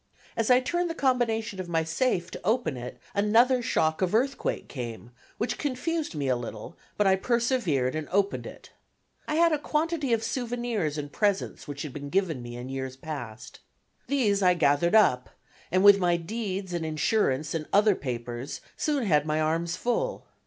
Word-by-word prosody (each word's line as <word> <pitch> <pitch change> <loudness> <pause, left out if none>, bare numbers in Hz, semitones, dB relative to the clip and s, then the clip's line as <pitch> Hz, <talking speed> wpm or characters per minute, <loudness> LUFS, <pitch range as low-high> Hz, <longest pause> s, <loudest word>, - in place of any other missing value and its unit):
As 225 0 0
I 250 0 +7
turned 345 +7 -1
the 330 - -4
combination 230 - 0
of 180 -2 -5
my 165 -1 +1
safe 175 0 0
to - - -7
open 220 - +1
it 125 0 -7 0.2
another 230 +5 +4
shock 160 -9 +1
of 185 +2 +1
earthquake 270 +4 0
came, 120 -3 -7 0.3
which 225 - -2
confused 295 - -2
me 145 -2 -2
a 130 - +3
little, 115 -3 -7 0.2
but 210 - +2
I 190 -1 +5
persevered 205 - +1
and 155 -1 -4
opened 200 +1 0
it. - - -12 0.6
I 305 - -1
had 335 +1 +4
a 305 - +1
quantity 300 -2 -1
of 225 -1 +2
souvenirs 235 - -2
and 145 -1 -5
presents 200 +1 -1
which 145 0 -5
had 150 -4 -7
been 145 -1 -6
given 175 -6 0
me 120 0 -8
in 120 +1 -6
years 130 -1 -5
past. 125 -6 -7 0.5
These 215 -8 +2
I 180 -1 +5
gathered 165 +3 +3
up, 125 - +4 0.4
and 185 +2 +3
with 200 0 +8
my 175 -2 +2
deeds 195 0 -4
and 170 -1 -2
insurance 155 -2 0
and 160 -2 -3
other 210 +1 +5
papers 120 -2 -5 0.2
soon 290 -4 0
had 150 -5 +2
my 155 0 +1
arms 165 +2 0
full. 375 - -1
185 Hz, 180 wpm, -27 LUFS, 150-240 Hz, 0.6 s, with